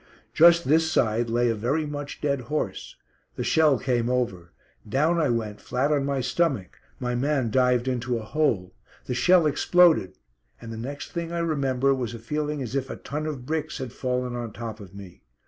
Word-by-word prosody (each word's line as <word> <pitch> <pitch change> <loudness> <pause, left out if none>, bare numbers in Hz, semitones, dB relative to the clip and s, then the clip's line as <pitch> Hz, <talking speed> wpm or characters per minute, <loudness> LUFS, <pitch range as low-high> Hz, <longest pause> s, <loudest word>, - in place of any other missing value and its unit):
Just 170 0 +6
this 160 +2 +3
side 115 -2 +1
lay 120 +1 +2
a - - +1
very 125 +9 -1
much 145 -1 -6
dead 140 -3 0
horse. 155 - -3 0.4
The - - -3
shell 155 -4 +4
came 120 -2 0
over. 100 -9 -2 0.4
Down 155 +8 +2
I 155 - +2
went 110 -3 -2
flat 135 +4 0
on 145 -2 +1
my 140 -1 -1
stomach. 125 - -1 0.2
My 125 -1 -2
man 130 -2 0
dived 125 0 +2
into 125 -1 -1
a 115 - -6
hole. 115 -10 0 0.3
The - - -3
shell 175 +6 +4
exploded, 160 - +3 0.4
and 115 - -8
the - - -6
next 140 +6 -6
thing 170 -1 -4
I 170 - -3
remember 140 -5 +1
was 120 -3 -3
a - - -6
feeling 150 +4 -3
as 120 - -6
if 135 -1 -1
a - - -4
ton 150 +2 -5
of 135 -5 -5
bricks 155 +1 -3
had 130 -3 -6
fallen 125 -1 -2
on 120 -3 -5
top 115 -2 -6
of 100 -2 -12
me. 95 -3 -11
130 Hz, 195 wpm, -25 LUFS, 120-150 Hz, 0.4 s, Just